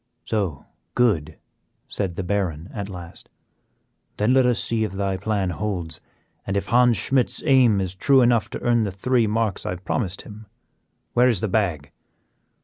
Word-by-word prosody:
"So, 95 -10 -2 0.3
good," 80 -11 +1 0.5
said 95 -4 -1
the 95 - -3
Baron 90 -3 -2
at 100 -2 -5
last; 90 -3 -10 0.9
"then 105 +4 +2
let 130 -1 +4
us 125 - +2
see 115 -1 0
if 105 -3 -3
thy 95 0 -1
plan 100 -1 -1
holds, 90 -4 -4 0.5
and 100 - 0
if 100 - -3
Hans 120 -1 +4
Schmidt's 130 -2 0
aim 130 -8 +5
is 95 -2 -2
true 135 +8 +4
enough 120 -2 +3
to - - -6
earn 120 -1 +2
the 105 -3 -1
three 115 +4 +1
marks 110 -2 -1
that - - -4
I - - -1
have 90 +1 -11
promised 100 -7 -2
him. 105 0 -12 0.7
Where 125 +1 +4
is 115 -6 +1
the 110 - -1
bag?" 90 -8 -1
105 Hz, 175 wpm, -23 LUFS, 95-120 Hz, 0.9 s, aim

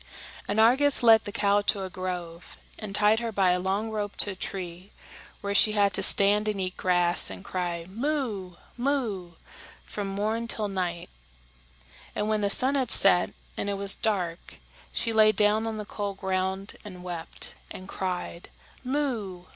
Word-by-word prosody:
And 205 +2 -1
Argus 265 +5 +4
led 225 -2 +6
the 205 - -5
cow 200 0 +1
to 200 -1 0
a 190 - -6
grove, 180 -2 -7 0.2
and 210 -3 -5
tied 210 +1 +5
her 235 -1 -4
by 195 -3 +2
a 180 - 0
long 195 +4 -2
rope 205 -2 -4
to 205 - +4
a - - -8
tree, 185 0 -7 0.5
where 200 0 -3
she 210 +2 +5
had 200 -2 +2
to - - +7
stand 205 +2 +5
and 210 -2 -2
eat 185 -1 -4
grass, 175 -1 +2
and 95 -1 -10
cry, 175 -2 -4
"Moo! 220 - -4 0.2
moo!" 235 -10 -2 0.5
from 205 -1 -6
morn 215 +4 -3
till 215 -2 +2
night; 180 -3 -4 1.0
and 210 - -2
when 215 -1 0
the 200 - 0
sun 260 +7 +4
had 265 -4 -1
set, 185 -2 +5 0.3
and 200 - -3
it 200 - -2
was 200 0 +6
dark, 180 -6 -3 0.4
she 230 - -2
lay 215 -1 +5
down 215 +1 +1
on 220 -1 -4
the 210 - -6
cold 200 -1 -5
ground 190 0 -3
and 185 -3 -11
wept, 175 -2 -3 0.2
and 185 - -10
cried, 180 -3 -5 0.3
"Moo! 245 -10 -3
200 Hz, 170 wpm, -26 LUFS, 185-220 Hz, 1.0 s, to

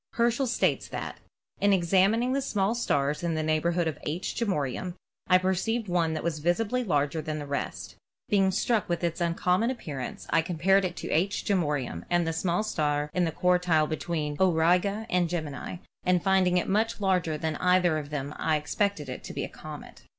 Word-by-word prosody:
Herschel 240 +3 +1
states - - +1
that: - - -6 0.4
"In 205 - +3
examining 195 +7 +3
the 275 - +1
small 205 -5 0
stars 145 -11 0
in 170 -2 -1
the 155 - -1
neighborhood 165 +2 +1
of 155 - -3
'H. 165 +5 -3
Geminorum' 180 - -2 0.3
I 185 - +6
per 185 +1 +1
ceived 225 +4 -1
one 170 -3 +1
that - - -3
appeared 155 -2 -2
visibly 220 +9 +1
larger 150 -5 0
than 155 0 -4
the 145 - -5
rest; 140 0 -4 0.3
being 195 -2 +3
struck 215 +2 0
with 175 0 -1
its 170 +1 -1
uncommon 180 +6 +1
appearance 150 - -5
I 165 - +4
compared 185 +3 +2
it 175 -1 -3
to - - -5
*H. 190 +6 0
Geminorum' 145 - -1
and 175 -1 +2
the 165 - -1
small 175 +4 0
star 150 -7 -1
in 180 -1 +2
the 165 - -1
quartile 180 -2 +2
be 155 - -1
tween 150 -4 -3
'Auriga' 180 +4 +2
and 180 -4 +1
'Gemini,' 160 0 -4 0.3
and 180 -1 +2
finding 190 -2 +3
it 180 - +1
so - - -3
much 220 +3 +1
larger 180 -6 +1
than 155 0 -2
either 180 -3 +3
of 145 -1 -8
them 145 -1 -4
I 155 -1 +1
suspected 200 -1 -1
it 130 - -6
to - - -7
be - - -3
a - - -4
comet." - - -10
175 Hz, 195 wpm, -28 LUFS, 155-195 Hz, 0.4 s, I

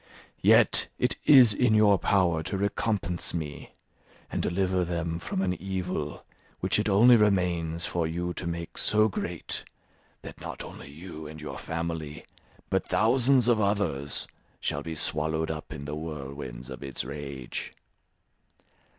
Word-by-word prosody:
Yet - - +5
it - - +1
is 130 -7 +8
in 115 +1 +3
your 105 -3 +5
power 90 -5 +2
to 95 - -3
recompense 100 -3 -1
me, 75 -3 -6 0.6
and - - -1
deliver 95 0 +1
them 85 -1 -2
from 95 +2 -2
an 90 -1 +1
evil 90 -6 -3 0.3
which - - +1
it 105 - 0
only 115 +5 +7
remains 90 -6 +1
for 85 -2 -1
you 90 +2 -3
to 90 - -5
make 85 0 -4
so 110 0 +4
great, 90 -4 -4 0.6
that - - -10
not - - -6
only - - -10
you 80 +1 -9
and 80 +1 -9
your 75 - -6
family, 80 -2 -4 0.5
but - - +1
thousands 125 +2 +3
of 115 -3 +4
others, 90 -9 0 0.3
shall 70 - -2
be 80 +2 -5
swallowed 80 +1 0
up 75 -1 -7
in 75 -2 -7
the 75 +1 -4
whirlwinds 70 -5 -7
of 65 - -8
its 70 -2 -4
rage. 70 -3 -6
85 Hz, 145 wpm, -28 LUFS, 75-100 Hz, 0.6 s, is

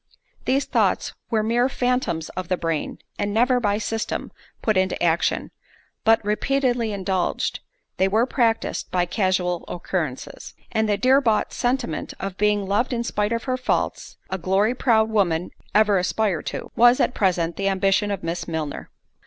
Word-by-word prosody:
These 270 +2 +2
thoughts - - +1 0.2
were 220 -2 +1
mere 240 +3 +2
phantoms 245 -12 -1
of 185 -1 -5
the 185 - 0
brain, 165 -3 -2 0.2
and 205 0 0
never, 245 +4 +3
by 205 -3 +1
system, 225 +1 -3 0.3
put 215 - +2
into 185 0 +1
action; 170 -1 +1 0.5
but, 225 -1 +4
repeatedly 245 +1 +1
indulged, 190 -2 -1 0.4
they 190 - +3
were 220 +5 +3
practised 230 -4 0
by 180 -1 +1
casual 180 -2 0
occurrences; 170 -6 -4 0.2
and 220 -2 +1
the 205 - +2
dear 260 +5 +4
bought 225 -5 +1
experiment 245 -10 -2
of 195 -1 -4
being 210 0 +1
loved 210 +7 0
in 235 -1 -1
spite 210 -2 -1
of 230 0 -1
her 255 -1 -1
faults, 255 - -2
(a 190 - -2
glory 195 +6 +2
proud 225 -4 +2
women 180 -5 +1 0.2
ever 210 -2 +5
aspire 185 -1 0
to) - - -6
was, 240 +1 +6
at - - +2
present, 175 -6 +1
the 195 0 0
ambition 195 +1 +2
of 200 -2 -3
Miss 170 +1 -3
Milner. 160 -3 -4
205 Hz, 160 wpm, -23 LUFS, 185-235 Hz, 0.5 s, was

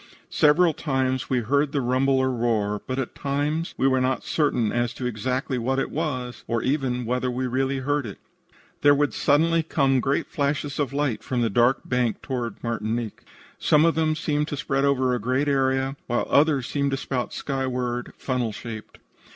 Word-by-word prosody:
Several 160 +3 +4
times 130 -4 -1
we 125 -2 +1
heard 140 +5 +1
the 145 - +1
rumble 130 +2 +2
or 130 0 +2
roar, 110 -4 0
but 130 - -2
at 135 -3 -3
the - - -19
time 145 +4 0
we 135 - +3
were 130 -1 +2
not 130 0 0
certain 125 -8 +1
as 120 0 -1
to 125 - -5
exactly 125 +3 -2
what 130 +3 0
it 135 - -1
was, 130 -6 -3
or 115 -1 -1
even 130 -3 0
whether 125 +2 0
we 125 +1 -2
really 135 +2 0
heard 140 0 -1
it. 100 - -8 0.6
"There 145 0 +6
would 145 0 +1
suddenly 165 +3 +3
come 135 -4 +2
great 135 +3 0
flashes 145 0 -2
of 140 -3 0
light 140 -4 -1
from 125 -2 -1
the 115 - 0
dark 120 +4 +3
bank 125 -3 -1
toward 120 -5 -4
Martinique. 115 -1 -3 0.4
Some 150 +1 +4
of 165 - +4
them 160 -1 +1
seemed 150 -1 -1
to 145 - -4
spread 135 -1 0
over 130 -2 +2
a 125 - 0
great 130 +6 0
area, 135 -1 +1
while 120 0 0
others 145 -3 +3
appeared 140 -1 0
to 135 - -1
spout 130 -2 -3
skyward, 125 -3 -3
funnel 125 -4 -1
shaped. 110 +1 -8
130 Hz, 190 wpm, -24 LUFS, 125-145 Hz, 0.6 s, There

